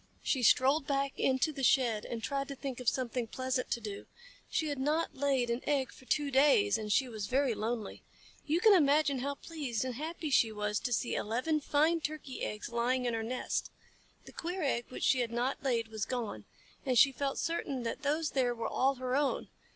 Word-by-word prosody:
She 265 - +1
strolled 270 +5 +4
back 275 -1 0
into 265 +4 +1
the 275 - -6
shed 240 -5 +3
and 230 -2 -5
tried 275 0 -2
to 280 - -6
think 265 -2 -5
of 250 -2 +2
something 250 -2 -2
pleasant 255 +2 -2
to - - -1
do. 205 -3 -7 0.4
She 315 - 0
had 285 -2 -3
not 305 +5 0
laid 265 -3 +1
an 235 +2 -1
egg 275 -3 +1
for 260 - -16
two 290 +1 0
days, 295 +10 +4
and 210 -1 -4
she 260 +4 +3
was 215 -4 -5
very 265 -1 +2
lonely. 220 0 -4 0.5
You 320 +4 +1
can 435 0 +7
imagine 290 -4 +4
how 280 +2 -2
pleased 275 -8 -4
and 255 - -3
happy 310 +3 -4
she 230 -4 +4
was 210 0 -1
to 245 - -3
see 240 +1 0
eleven 255 +9 0
fine 310 +4 +2
Turkey 300 -4 -5
eggs 210 +1 -4
lying 245 +2 0
in 240 - 0
her 225 - -1
nest. 245 +3 -2 0.6
The - - -11
queer 355 +2 -4
egg 240 -4 0
which - - -6
she 260 - +4
had 240 -2 0
not 245 +3 -1
laid 235 -4 0
was 220 -2 -3
gone, 225 - -4 0.4
and 255 -2 +1
she 275 +4 +7
felt 275 +1 -2
certain 280 -6 -2
that 230 - -4
those 300 +2 0
there 250 -3 +1
were 230 -1 -3
all 270 +2 +1
her 255 0 -2
own. 285 -1 0
260 Hz, 210 wpm, -32 LUFS, 235-285 Hz, 0.6 s, can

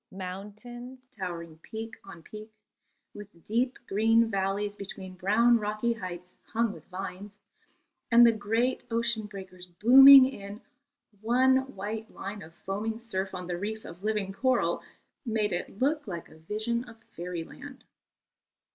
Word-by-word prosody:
Mountains, 215 +7 -8
towering 170 -5 -6
peak 225 +5 -7
on 175 -4 -12
peak, 215 +4 -10 0.6
with 205 -5 -12
deep 245 +4 0
green 225 +3 +3
valleys 200 +1 -1
between 190 -2 -8
brown 220 +6 +3
rocky 215 +3 -1
heights 180 -4 -8 0.2
hung 230 -2 +1
with - - -13
vines, 195 +2 -7 0.7
and 235 0 +8
the 235 - +7
great 225 +4 0
ocean 230 -2 0
breakers 190 -3 -9
booming 260 +9 +9
in 205 -5 -6 0.6
one 260 +3 +3
white 215 +3 -5
line 200 +1 -7
of 165 +1 -13
foaming 215 +3 -3
surf 195 -5 -4
on 180 0 -5
the 175 0 -4
reef 220 +2 -4
of 170 +2 -10
living 210 -3 -1
coral, 260 +4 +1 0.4
made 220 -5 0
it 175 +2 -4
look 290 +1 +1
like 170 -4 -6
a - - -16
vision 215 +7 -2
of 235 -2 -13 0.2
fairyland. 180 - -7
210 Hz, 140 wpm, -28 LUFS, 190-235 Hz, 0.7 s, booming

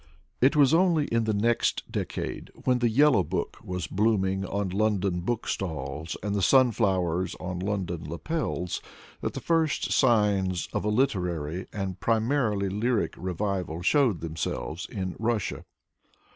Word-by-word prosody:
It 135 +5 +5
was 145 0 +5
only 165 -3 +4
in 115 -1 +1
the 110 - +1
next 115 +3 +1
decade, - - -4
when 125 -1 +1
the 120 -1 +2
Yellow 130 -2 +5
Book - - -3
was 90 -2 -3
blooming 95 +1 +1
on 100 0 -2
London 100 -2 +1
bookstalls 80 - -3
and 105 -1 -1
the 100 - 0
sunflowers 95 -9 +3
on 90 -1 -5
London 90 -5 -3
lapels, 90 - -3 0.4
that - - -2
the - - -2
first 165 -3 +1
signs 100 -7 +2
of - - -1
a 105 - 0
literary, 90 - 0
and 95 -3 -4
primarily 110 -3 +1
lyric 105 +4 0
revival 90 -2 -3
showed 125 - +3
themselves 80 +1 -4
in 95 -3 -4
Russia. 110 -2 -1
100 Hz, 135 wpm, -27 LUFS, 90-120 Hz, 0.4 s, It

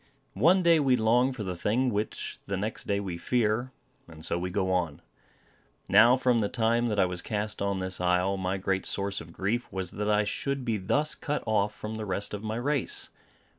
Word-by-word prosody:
One 180 +6 +5
day 170 -2 +5
we 135 -3 +3
long 120 +3 +3
for 125 -4 -5
the 90 -2 -3
thing 115 +9 +1
which 105 0 -3
the 100 0 -2
next 105 +3 -3
day 100 0 0
we 90 -4 -5
fear; 120 +2 0 0.4
and 80 -1 -10
so - - -1
we 90 +1 -3
go 95 0 0
on. 85 -5 -1 0.9
Now, 115 +5 +7
from 125 -2 +2
the 105 -2 0
time 115 +1 +1
that 105 -3 -1
I - - +5
was 90 -1 -3
cast 105 -1 -3
on 100 -1 0
this 95 -1 -2
isle, 90 +2 +2
my 95 0 -2
great 95 0 -1
source 100 0 -2
of 80 - -12
grief 105 +8 -2
was 95 -2 -3
that 105 0 -2
I 105 0 +3
should 140 +5 -2
be 115 -3 0
thus 145 +11 +1
cut 150 -1 -3
off 105 -1 +1
from 110 +1 -6
the 110 - -4
rest 100 +2 -2
of 105 - -4
my 110 0 -3
race. 135 +3 -1
105 Hz, 210 wpm, -28 LUFS, 95-120 Hz, 0.9 s, Now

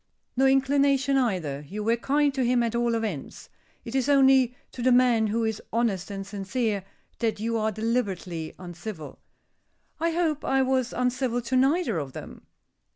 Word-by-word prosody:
"No 265 +2 +4
inclination, 275 0 +3
either. 180 - 0
You 210 +5 -5
were 230 +2 +2
kind 285 +4 +1
to 265 -1 0
him 245 0 +2
at 230 -1 -1
all 235 0 +1
events. 215 -11 -5 0.4
It 230 - -7
is 265 0 0
only 265 -3 +5 0.2
to 250 - -8
the 255 +1 +3
man 245 -3 +4
who 225 +2 0
is 220 -1 -2
honest 220 -6 0
and 195 -1 -5
sincere 200 +1 -2 0.4
that 225 -3 -1
you 230 +2 -1
are 220 0 0
deliberately 195 -7 -2
uncivil." 175 -2 -8 0.8
"I 335 +1 +1
hope 325 -3 0
I 270 0 +2
was 260 -1 0
uncivil 250 -1 0
to 240 +2 -2
neither 270 - +2
of 135 -3 -6
them." - - -10
235 Hz, 165 wpm, -26 LUFS, 210-265 Hz, 0.8 s, only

